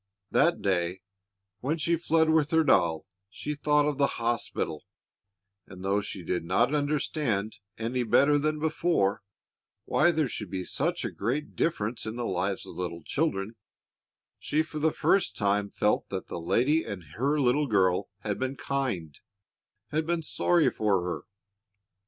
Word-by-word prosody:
That 170 +4 +3
day, 90 -1 0 0.6
when 145 +9 -1
she 170 +2 +1
fled 160 -1 +2
with 155 -2 +3
her 160 0 +4
doll, 85 - +3 0.2
she 150 +8 -4
thought 150 0 +2
of 145 -2 -1
the 140 - +5
hospital; 115 -9 -2 0.8
and 95 0 -10
though 100 +1 +2
she 95 -2 -6
did 90 +1 -1
not 115 - +2
understand 145 -7 -1 0.2
any 120 +3 -1
better 140 +6 +4
than 155 +1 0
before 160 - +1 0.6
why 175 - +4
there 160 -4 +1
should 105 -5 -6
be 95 0 -3
such 170 - -1
great 130 - -2
difference 115 -9 -1
in 110 - -4
the 120 -1 -3
lives 95 0 -1
of - - -9
little 85 -2 -4
children, 115 - -1 0.8
she 155 +2 +1
for 155 -1 -6
the 160 +1 +3
first 195 +3 +2
time 100 0 +1
felt 105 +1 0
that 95 -2 -5
the 85 - -5
lady 125 - +2
and 100 -3 -6
her 140 +5 +1
little 140 +2 +2
girl 95 -4 +2
had 105 -1 -3
been 130 +1 -2
kind, 120 - -3 0.7
had 155 +1 -1
been 170 -1 0
sorry 170 +1 +2
for 100 -4 +1
her. 90 -1 -4
120 Hz, 155 wpm, -28 LUFS, 95-150 Hz, 0.8 s, the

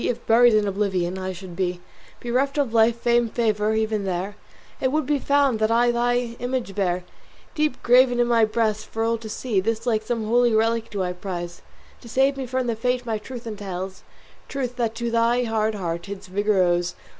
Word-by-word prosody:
If 240 -1 -2
buried 235 0 +5
in 210 -1 +2
oblivion 190 -2 -1
I 185 0 -3
should 185 -1 -9
be, 180 -1 -1 0.4
Bereft 260 +4 0
of 275 -6 0
life, 225 +1 +4
fame, 235 -1 +2
favour, 215 -2 0
even 220 -1 0
there 190 +2 -3 0.5
It 260 - +1
would 305 0 0
be 290 +1 +1
found 280 -4 +2
that 215 0 +2
I 240 +1 +3
thy 240 0 0
image 245 -4 -3
bear 180 -3 0 0.5
Deep 305 -4 -1
graven 245 0 +5
in 240 - +4
my 235 -1 +3
breast 215 -1 0
for 225 - -3
all 230 0 0
to 220 -1 -8
see. 215 -2 -1
This 225 +4 -2
like 220 -3 +1
some 225 0 -3
holy 240 +1 +3
relic 225 +1 +1
do 200 -3 -2
I 180 0 -2
prize 175 -2 -6 0.4
To 235 - -12
save 270 +4 +2
me 265 -2 -5
from 255 +1 -1
the 235 -2 -1
fate 250 +2 -1
my 220 -2 -2
truth 245 +2 -9
entails, 190 -3 -6 0.5
Truth 255 -3 -3
that 230 -2 -1
to 235 0 -3
thy 235 +2 +2
hard 220 -2 0
heart 170 -1 -4
its 200 -1 -7
vigour 200 +1 +1
owes. 175 0 0
225 Hz, 200 wpm, -23 LUFS, 200-245 Hz, 0.5 s, buried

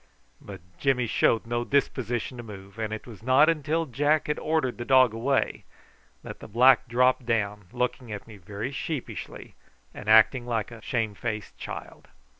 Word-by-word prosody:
But 95 -3 -10 0.2
Jimmy 130 -3 +2
showed 115 0 +2
no 120 +1 -1
disposition 125 -2 -1
to - - -6
move, 100 -1 -11
and 110 -1 -2
it 110 - -5
was 115 -4 -12
not 130 +6 +5
until 160 +1 0
Jack 145 +3 +1
had 150 - -2
ordered 155 -6 -1
the - - -2
dog 130 -3 +5
away 130 +5 0 0.6
that - - -9
the - - -10
black 125 +4 +5
dropped 125 +1 +2
down, 105 -3 -1
looking 125 -1 -2
at 105 -1 -6
me 110 -2 -12
very 100 +7 -6
sheepishly 145 -1 -6 0.4
and 105 - -7
acting 120 +3 +5
like 115 -1 -2
a 115 -1 -11
shamefaced 110 -2 -3
child. - - -9
120 Hz, 165 wpm, -26 LUFS, 110-130 Hz, 0.6 s, not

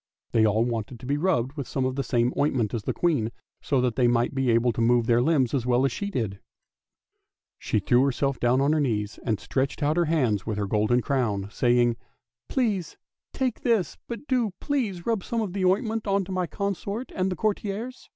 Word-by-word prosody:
They 110 -1 +4
all 110 +2 +2
wanted 115 0 -4
to 125 - -10
be 140 +3 0
rubbed 145 -7 +1
with 145 -3 -5
some 130 - -1
of 130 0 -1
the 140 - 0
same 120 0 +1
ointment 130 -7 +1
as 115 - -1
the - - 0
Queen, 145 -11 +1 0.3
so 140 - +1
that 125 -3 0
they 125 -2 +4
might 120 +1 +2
be 135 -2 0
able 115 +1 +3
to 115 - -3
move 120 0 +3
their 120 +1 +3
limbs 135 -3 +2
as 125 -3 0
well 125 +2 +3
as 135 - +1
she 200 - -3
did. 110 - -3 1.2
She - - -1
threw 120 +5 +3
herself 135 0 0
down 120 +2 +3
on 145 +2 +3
her 155 - +2
knees 110 -7 -1
and 110 -4 0
stretched 135 +2 -2
out 150 +3 +1
her 175 - +3
hands 130 -11 +1
with 110 -2 -3
her 105 - -1
golden 110 +4 +1
crown, 105 -7 -1
saying, 120 -1 +2 0.2
" - - -60
Pray, 225 -8 +1 0.5
take 255 -3 -2
this, 225 -7 +1
but 235 +4 -6
do, 240 -7 +1
please, 220 - -2
rub 225 -5 0
some 235 - -2
of 200 -5 -3
the 195 -2 0
oint 185 +3 +3
ment 220 -1 -3
on 195 -1 +1
to 190 - -8
my 185 -1 -1
consort 200 +5 -4
and 185 0 0
the - - -1
courtiers! 215 +5 -3
135 Hz, 220 wpm, -26 LUFS, 120-190 Hz, 1.2 s, They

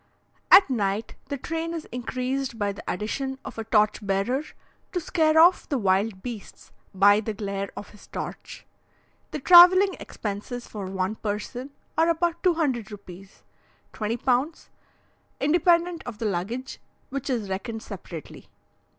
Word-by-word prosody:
At 385 +1 +9
night 215 -4 -1
the 280 - -3
train 330 +4 -4
is 325 - -5
increased 255 +1 -3
by 205 -2 0
the 200 - -10
addition 265 +7 -3
of - - -7
a - - -2
torch 215 -1 +2
bearer, 200 +7 0 0.5
to 360 - 0
scare 315 -1 +2
off 345 +3 +5
the 280 - +1
wild 195 -1 +1
beasts 235 -5 -8 0.2
by 205 +2 +5
the 220 0 -4
glare 200 -1 -4
of 205 - -8
his 210 - -17
torch. - - -7 0.6
The - - -4
travelling 365 +5 +8
expenses 215 +4 -6
for 200 -3 -6
one 190 +2 -2
person 220 +5 -4 0.3
are 330 +1 +4
about 340 0 0
200 295 - +1
rupees 195 -1 -12 0.5
(20 220 +2 -2
pounds), 260 +6 -1 0.7
independent 340 +2 +2
of 235 -4 -6
the 225 - -4
luggage, 215 +7 -3 0.3
which 275 0 -4
is 235 -6 -1
reckoned 220 +4 -4
separately. 175 -6 -9
235 Hz, 140 wpm, -25 LUFS, 205-305 Hz, 0.7 s, At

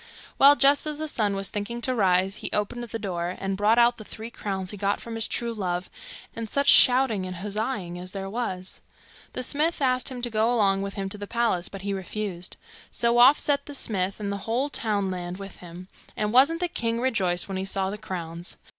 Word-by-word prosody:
Well, 280 +1 +8
just 285 +2 +3
as 300 -1 -3
the 310 +1 -3
sun 210 -8 0
was 195 0 -1
thinking 210 +3 -4
to 255 - 0
rise, 190 -3 +2
he - - -4
opened 210 +4 -1
the 225 0 -5
door, 180 -4 -3
and 195 0 -2
brought 210 +3 +3
out 240 0 +5
the 215 - -9
three 225 +2 -8
crowns 190 -4 -4
he - - -7
got 200 +1 0
from 230 - -8
his 225 0 +1
true 235 -1 -3
love, 180 -4 -3 0.4
and 230 -1 -5
such 280 +4 0
shouting 245 -7 +6
and 185 - -6
huzzaing 200 -1 -3
as 180 +1 -7
there 195 0 -5
was! 190 -4 -4 0.5
The 255 - -2
smith 310 +6 0
asked 255 -2 +2
him 250 -2 -7
to 240 - 0
go 220 +2 +2
along 200 -5 +2
with 200 0 -4
him 195 -1 -3
to 205 - -5
the 205 - -6
palace, 230 -7 0
but 195 - -8
he 200 0 -2
refused; 190 -1 -4 0.3
so 235 0 +1
off 260 +4 +8
set 280 -1 0
the 290 - -6
smith, 195 -6 -1
and 200 -1 -3
the 200 - -2
whole 260 +5 0
townland 190 -6 -2
with 195 -1 -9
him; 175 +1 -11 0.3
and 210 0 -1
wasn't 290 +7 +5
the 355 - +1
king 230 -7 -2
rejoiced 190 -9 0
when 195 -1 -4
he 190 - -2
saw 195 0 -1
the 210 - -6
crowns! 175 -4 -6
210 Hz, 220 wpm, -26 LUFS, 190-240 Hz, 0.5 s, Well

